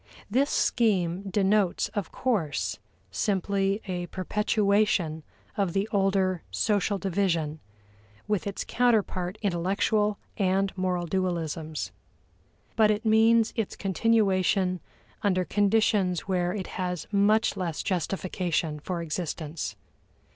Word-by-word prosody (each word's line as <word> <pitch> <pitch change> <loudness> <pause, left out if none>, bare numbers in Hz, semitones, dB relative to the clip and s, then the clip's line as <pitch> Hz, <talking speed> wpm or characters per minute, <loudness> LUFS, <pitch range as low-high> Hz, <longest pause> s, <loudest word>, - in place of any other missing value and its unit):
This 270 +6 +2
scheme 195 -5 +1
denotes, 195 -1 +2
of 200 -5 -4
course, 145 - -1 0.3
simply 195 - 0
a 180 -2 -3
perpetuation 200 -4 +1 0.3
of 195 -5 0
the 195 +2 0
older 195 -3 +1
social 205 -1 +1
division, 170 -5 -1 0.7
with 210 -2 0
its 200 - -4
counterpart 210 -6 +1
intellectual 200 +3 +1 0.2
and 195 -1 +1
moral 180 -2 -1
dualisms. 160 - -2 0.8
But 215 -2 +5
it 215 +1 0
means 225 +1 +4
its 225 -4 -2
continuation 190 -2 +2 0.4
under 185 -4 +1
conditions 205 -3 +2
where 180 -2 0
it 195 -2 -4 0.2
has 180 -3 -2
much 210 +2 +3
less 175 -5 -3
justification 175 -4 -1
for 170 +2 -4
existence. 160 -1 -4
190 Hz, 105 wpm, -27 LUFS, 175-210 Hz, 0.8 s, But